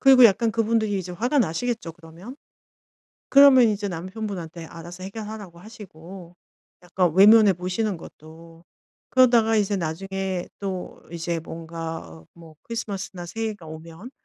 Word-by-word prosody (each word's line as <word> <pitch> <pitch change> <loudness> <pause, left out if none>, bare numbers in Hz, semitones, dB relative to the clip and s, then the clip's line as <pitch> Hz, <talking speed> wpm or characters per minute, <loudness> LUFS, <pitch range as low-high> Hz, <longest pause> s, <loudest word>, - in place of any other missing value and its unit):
그리고 265 -2 +7
약간 225 +1 +4
그분들이 220 -2 0
이제 180 -1 -6
화가 245 +10 0
나시겠죠, 225 -2 -1
그러면. 170 +8 -12 0.9
그러면 275 -3 +8
이제 205 -1 -2
남편분한테 180 -2 -6
알아서 170 +2 -10
해결하라고 205 -3 -8
하시고 185 -4 -12 0.5
약간 180 -1 0
외면해 210 +2 +7
보시는 185 +3 -2
것도, 165 +1 -14 0.5
그러다가 240 -3 +4
이제 205 -1 +1
나중에 190 +2 -4
또 190 -2 -6
이제 170 0 -3
뭔가 165 - -8
뭐 165 -2 -15
크리스마스나 200 -6 -6
새해가 215 -1 -5
오면 165 +8 -10
190 Hz, 325 characters per minute, -24 LUFS, 170-220 Hz, 0.9 s, 그러면